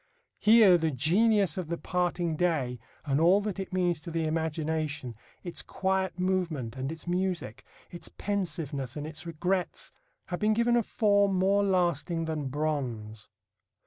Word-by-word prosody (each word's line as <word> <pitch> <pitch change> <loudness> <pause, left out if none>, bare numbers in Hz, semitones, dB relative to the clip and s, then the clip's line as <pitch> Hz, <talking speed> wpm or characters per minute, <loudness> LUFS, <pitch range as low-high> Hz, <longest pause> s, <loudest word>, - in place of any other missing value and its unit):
Here 210 -5 +7
the 160 0 +1
genius 185 - +3
of 180 - -4
the 170 +1 -2
parting 175 -2 -1
day, 150 -8 0 0.3
and 140 +1 +1
all 180 +4 +6
that 205 -2 -4
it 190 - -5
means 180 -3 +1
to 170 - -7
the 165 -1 -1
imagination, 155 -4 -2 0.3
its 175 - -3
quiet 190 -1 -1
movement 175 -10 -1
and 135 +2 -3
its 160 - -7
music, 175 - -2 0.3
its 175 - -5
pensiveness 165 -10 -3
and 150 - -4
its 155 +1 -8
regrets, 180 +3 -2 0.3
have 175 - -4
been 215 0 +3
given 235 +2 +2
a 240 - +4
form 200 -3 +2
more 195 +2 +3
lasting 175 -3 +1
than 155 -3 -3
bronze. 125 -8 -3
170 Hz, 150 wpm, -29 LUFS, 150-190 Hz, 0.3 s, Here